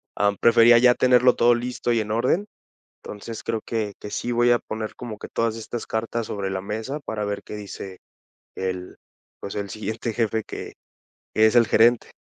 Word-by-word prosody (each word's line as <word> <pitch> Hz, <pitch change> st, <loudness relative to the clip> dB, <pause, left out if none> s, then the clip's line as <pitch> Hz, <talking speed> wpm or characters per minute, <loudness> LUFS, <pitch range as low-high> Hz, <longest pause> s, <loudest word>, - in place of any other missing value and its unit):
am, 100 Hz, -1 st, +1 dB
prefería 115 Hz, 0 st, +6 dB
ya 125 Hz, +1 st, +6 dB
tenerlo 125 Hz, 0 st, +4 dB
todo 120 Hz, 0 st, +4 dB
listo 120 Hz, 0 st, -2 dB
y 115 Hz, -, +2 dB
en 105 Hz, 0 st, -5 dB
orden. 125 Hz, -, +1 dB, 0.6 s
Entonces, 105 Hz, +2 st, -8 dB
creo 115 Hz, -1 st, -2 dB
que, 110 Hz, -3 st, -2 dB
que 105 Hz, -, -8 dB
sí 120 Hz, -, -2 dB
voy 120 Hz, +1 st, +4 dB
a 120 Hz, -, +4 dB
poner 110 Hz, 0 st, -5 dB
como 115 Hz, -4 st, -7 dB
que -, -, -9 dB
todas 115 Hz, -1 st, -1 dB
estas 115 Hz, +1 st, -6 dB
cartas 115 Hz, +1 st, -2 dB
sobre 100 Hz, -2 st, -3 dB
la 95 Hz, -, -2 dB
mesa 110 Hz, +9 st, -4 dB
para 105 Hz, -1 st, -3 dB
ver 100 Hz, 0 st, -4 dB
qué 105 Hz, -, -8 dB
dice 100 Hz, -2 st, -8 dB, 0.6 s
el 90 Hz, -1 st, -4 dB, 0.4 s
pues, 100 Hz, -, -7 dB
el 100 Hz, -1 st, -3 dB
siguiente 110 Hz, +3 st, -4 dB
jefe 110 Hz, -1 st, 0 dB
que -, -, -7 dB, 0.6 s
que 110 Hz, -, +6 dB
es 110 Hz, -, 0 dB
el 115 Hz, -2 st, +5 dB
gerente. 120 Hz, +1 st, +4 dB
110 Hz, 190 wpm, -24 LUFS, 105-120 Hz, 0.6 s, prefería